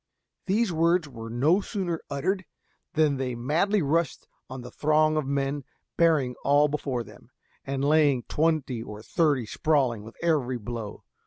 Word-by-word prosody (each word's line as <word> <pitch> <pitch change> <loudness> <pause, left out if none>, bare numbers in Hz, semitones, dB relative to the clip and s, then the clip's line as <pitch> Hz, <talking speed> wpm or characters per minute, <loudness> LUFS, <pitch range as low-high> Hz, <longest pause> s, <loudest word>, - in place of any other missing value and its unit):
These 205 0 +1
words 165 0 +2
were 115 -4 -8
no 145 - +3
sooner 185 -5 -3
uttered 185 +7 -1 0.5
than 150 -3 +2
they 130 -2 -2
madly 165 - +1
rushed 160 +1 0 0.2
on 130 0 -7
the 125 - -10
throng 155 +1 +2
of 155 -3 -1
men, 140 0 -1 0.3
bearing 155 -7 +3
all 145 +1 +4
before 140 -4 -2
them, 105 +2 -16 0.4
and 135 0 -1
laying 145 -4 +3
twenty 150 -6 0
or 105 -1 -8
thirty 145 -7 +1
sprawling 130 -3 +1
with 110 +2 -12
every 140 -7 +1
blow. 115 -2 -6
145 Hz, 150 wpm, -27 LUFS, 125-160 Hz, 0.5 s, all